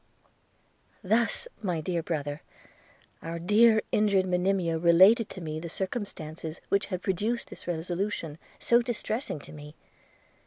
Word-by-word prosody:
Thus, 225 - +1
my 180 -6 -1
dear 170 +2 -2
brother, 145 -3 -3 0.8
our 165 +1 -5
dear 220 +5 +4
injured 200 -3 +3
Monimia 180 -2 +1
related 185 +7 +6
to 185 - -8
me 155 -1 -4
the 170 +1 -6
circumstances 165 -5 -5
which 200 - +1
had 185 -2 -4
produced 210 +5 -1
this - - -10
resolution, 175 -1 -3 0.2
so 235 0 +4
distressing 235 - -2
to 145 - -11
me. 150 0 -11
180 Hz, 125 wpm, -28 LUFS, 165-210 Hz, 0.8 s, related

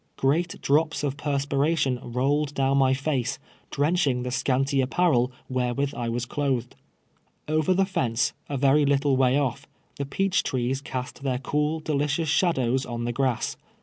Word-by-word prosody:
Great 165 +6 0
drops 155 +2 +2
of 140 -2 -1
perspiration 140 -1 0
rolled 140 +5 0
down 135 0 +2
my 135 -1 +4
face, 135 -2 -1 0.3
drenching 145 -4 +1
the 125 - -3
scanty 135 +2 +1
apparel 130 -2 +2 0.2
wherewith 130 +2 -1
I 120 -1 -3
was 120 +1 -2
clothed. 130 -3 -2 0.7
Over 155 +4 +2
the 195 +1 +3
fence, 125 - 0 0.2
a 140 - -2
very 140 +2 +4
little 140 -1 +2
way 130 0 +3
otf, 140 -1 -1 0.3
the 140 - -2
peach 195 +6 +1
trees 130 +1 -1
cast 130 0 -6
their 130 -2 -1
cool, 150 +4 -1
delicious 150 +1 0
shadows 135 -6 +2
on 120 -2 -4
the 120 - -1
grass. 130 -2 -1
135 Hz, 150 wpm, -25 LUFS, 125-150 Hz, 0.7 s, my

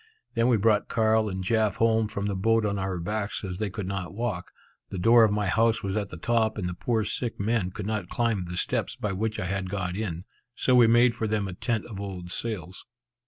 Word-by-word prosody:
Then 115 0 +2
we 120 -3 +4
brought 105 0 +2
Carl 110 -1 +2
and 95 -1 -4
Jaf 110 0 +1
home 110 -1 +2
from 100 -2 -3
the 100 -1 -1
boat 115 +3 +2
on 100 -1 -1
our 95 -2 -2
backs, 105 +5 -3
as 90 -1 -5
they 105 -2 -1
could 100 0 -5
not 95 -1 -4
walk. 105 -6 -3 0.4
The 95 - -5
door 115 +6 +6
of 110 - +4
my 105 0 0
house 115 +4 +2
was 95 0 -2
at 105 -2 -1
the - - -8
top, 110 +3 +1
and 95 -4 -2
the 90 - -3
poor 110 +5 0
sick 115 +3 -3
men 105 -2 0
could 95 +2 -6
not 100 -4 -2
climb 115 -6 0
the 90 0 -6
steps - - -1
by 105 - -3
which 110 +3 -2
I 95 +1 -1
got 90 -1 -3
in, 95 -4 -4 0.3
so 130 - +1
we 120 -2 +7
made 120 +1 +5
for 115 -1 -2
them 105 -2 0
a 95 - -5
tent 110 +3 -2
of 100 -4 -7
old 90 -3 -6
sails. 95 -3 -4
105 Hz, 235 wpm, -27 LUFS, 95-115 Hz, 0.4 s, we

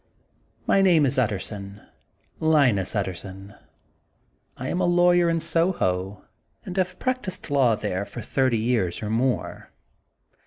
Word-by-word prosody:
My 195 - +3
name 170 -6 +4
is 130 -1 +1
Utterson, 100 -2 -3
ŌĆö 160 +8 -6
Linus 125 -12 +2
Utterson. 95 0 -5 1.0
I 130 - -5
am 180 - -1
a - - +2
lawyer 175 0 +4
in 165 0 +1
Soho, 155 - 0 0.4
and 180 - -6
have 185 -1 -1
practised 255 - -3
law 130 -5 +3
th^re 95 -1 -3
for - - -8
thirty 130 -3 +1
years 110 -5 -1
or 105 - -3
more. 125 +3 -1
130 Hz, 130 wpm, -24 LUFS, -, 1.0 s, name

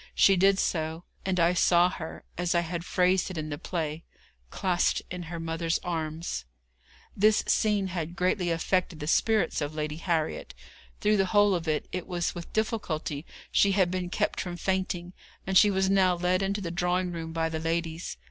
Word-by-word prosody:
She 195 - +6
did 195 +2 +4
so, 160 -2 -1 0.2
and 185 -1 +1
I 170 +1 +4
saw 175 0 +4
her, 165 -3 -7
as 175 0 0
I 170 - +4
had 170 0 -4
phrased 180 +1 +2
it 185 - -6
in 155 -1 -3
the 145 -1 -5
play, 160 -2 -3 0.5
'clasped 180 - +1
in 180 0 -4
her 170 -1 -5
mother's 165 0 -1
arms.' 160 - -3 0.7
This 215 +2 +4
scene 210 -2 +2
had 170 -1 -4
greatly 180 0 +1
affected 170 0 0
the 150 - -4
spirits 215 +4 +2
of 145 +1 -3
Lady 150 0 -3
Harriet. 165 -2 -2 0.5
Through 210 0 +3
the 195 -1 +2
whole 205 -1 +6
of 170 -2 -2
it, 155 -1 0
it 180 -1 -4
was 175 -2 -1
with 170 -1 -8
difficulty 170 - -2 0.2
she 200 -1 +4
had 185 -3 +3
been 185 -1 -2
kept - - -1
from 175 -1 -5
fainting, 185 -1 -2 0.3
and 190 - -2
she 205 - +7
was 190 -1 +1
now 190 -2 +4
led 180 +2 +1
into 200 +1 -1
the 170 -3 -4
drawing 180 +1 0
room 165 -1 -5
by 165 0 0
the 160 -1 -3
ladies. 165 - -2
175 Hz, 185 wpm, -28 LUFS, 165-190 Hz, 0.7 s, she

